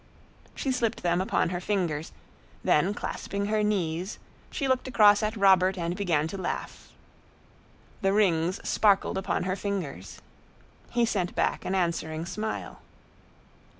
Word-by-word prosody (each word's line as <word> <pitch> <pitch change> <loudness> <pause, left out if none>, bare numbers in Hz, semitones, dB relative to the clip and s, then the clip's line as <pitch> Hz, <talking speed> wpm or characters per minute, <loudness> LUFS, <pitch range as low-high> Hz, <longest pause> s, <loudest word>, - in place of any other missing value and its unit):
She 270 - -1
slipped 240 -3 -1
them 175 +1 +2
upon 190 - +1
her 175 0 -3
fingers; 175 -6 -1 0.5
then 175 +6 +3
clasping 200 0 -4
her 215 +1 +1
knees, 185 -3 -1 0.3
she 275 - -2
looked 260 0 +1
across 210 -4 +5
at 215 +1 -1
Robert 190 -1 +4
and 170 0 -2
began 170 -6 +1
to 195 - -6
laugh. - - -5 1.1
The 195 -1 +2
rings 185 -3 +2
sparkled 200 -2 +3
upon 190 - -1
her 185 0 -1
fingers. 180 - -5 0.7
He 240 -1 +2
sent 185 -5 -1
back - - 0
an 190 - -1
answering 165 -3 -1
smile. 215 +4 -5
190 Hz, 135 wpm, -27 LUFS, 175-210 Hz, 1.1 s, across